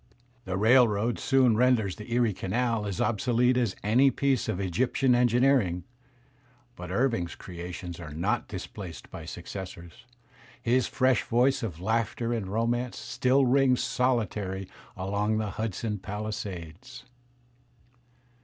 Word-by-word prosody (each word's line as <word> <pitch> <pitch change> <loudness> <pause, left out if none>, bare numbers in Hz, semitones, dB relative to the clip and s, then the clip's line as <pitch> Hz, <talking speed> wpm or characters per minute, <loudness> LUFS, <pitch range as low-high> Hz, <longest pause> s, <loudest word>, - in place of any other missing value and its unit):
The 95 0 -2
railroad 115 0 +4
soon 130 -4 +3
renders 115 -5 +2
the 105 +2 -10
Erie 120 -3 +2
Canal 110 +3 -1
as 100 -3 -4
obsolete 120 +3 +2
as 120 -6 0
any 120 +7 +4
piece 135 -3 0
of 90 - -1
Egyptian 125 +7 +1
engineering; 120 -7 +3 0.9
but 90 -4 -8
Irving's 100 -4 0
creations 90 -1 -7
are 85 -3 -7
not 100 +10 -1
displaced 95 -3 -8
by 80 - -8
successors; 90 +5 -8 0.5
his 125 +1 +1
fresh 130 -3 +2
voice 125 +3 +2
of 95 -9 -5
laughter 115 +3 -1
and 110 -5 -2
romance 120 +4 -1
still 130 +2 +2
rings 130 0 +3
soUtaiy 105 -7 -1 0.3
along 100 +3 0
the 110 -2 -2
Hudson 105 0 -3
palisades. 100 -4 -6
110 Hz, 120 wpm, -28 LUFS, 95-125 Hz, 0.9 s, railroad